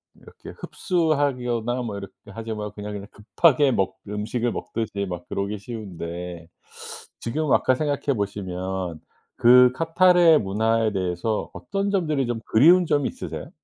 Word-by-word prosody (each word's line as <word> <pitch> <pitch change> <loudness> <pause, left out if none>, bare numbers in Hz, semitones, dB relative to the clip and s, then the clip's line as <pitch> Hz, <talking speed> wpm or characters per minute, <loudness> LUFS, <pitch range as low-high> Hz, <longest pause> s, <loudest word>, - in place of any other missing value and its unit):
이렇게 - - -14
흡수하거나 130 - -1
뭐 105 -4 -4
이렇게 100 0 -8 0.2
하지 115 +2 -5
말고 105 -1 -5
그냥 105 0 -7
이렇게 100 0 -7
급하게 135 +5 +3
먹 95 -3 0
음식을 110 +3 -2
먹듯이 105 -4 -4
막 90 -1 -6
그러기 100 +2 -2
쉬운데 90 -6 -7 0.7
지금 150 +7 -2
와서 130 -1 +3
생각해 145 0 -1
보시면 95 -4 -4 0.4
그 125 +1 +7
카타르의 165 +1 +5
문화에 110 +2 +1
대해서 95 +3 -2
어떤 200 0 -3
점들이 155 -9 0
좀 120 -1 -2
그리운 170 +10 +5
점이 145 -2 +1
있으세요? - - -7
115 Hz, 325 characters per minute, -24 LUFS, 100-140 Hz, 0.7 s, 그